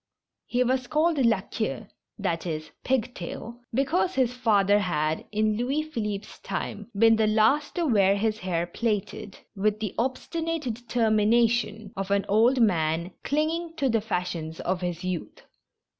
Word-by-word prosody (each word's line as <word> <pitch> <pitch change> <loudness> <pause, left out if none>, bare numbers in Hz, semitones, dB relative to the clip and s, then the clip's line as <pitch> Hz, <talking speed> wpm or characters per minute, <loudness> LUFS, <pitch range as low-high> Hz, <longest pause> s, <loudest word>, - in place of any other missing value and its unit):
lie 245 +1 +3
was 255 0 0
called 310 +1 +2
La 230 -6 +3
Queue 220 +1 -3 0.4
{i, 170 -3 +1
e.. 155 -2 -2 0.2
Pig 255 -2 0
tail) 230 +6 -7
because 295 +9 +1
his 250 -2 +2
father 205 -5 +3
had, 155 -5 -1
in 215 0 +1
Louis 270 +6 0
Philippe's 215 -9 -5
time, 210 +1 -5
been 225 +1 +6
the 220 -1 +3
last 220 +8 +2
to 345 -2 0
wear 200 -7 +4
his 215 +1 0
hair 175 -3 -1
plaited, 205 +1 -3 0.2
with 210 +2 +1
the 215 -4 -3
obstinate 325 +6 -2
determination 225 -2 +1
of 195 0 -4
an 200 0 +2
old 230 +6 +4
man 170 -5 +2
clinging 325 +3 -1
to 280 -5 +1
the 225 -2 +2
fashions 175 -6 -3
of 185 0 -1
his 175 -1 -3
youth. 185 -2 -4
220 Hz, 150 wpm, -26 LUFS, 195-250 Hz, 0.4 s, been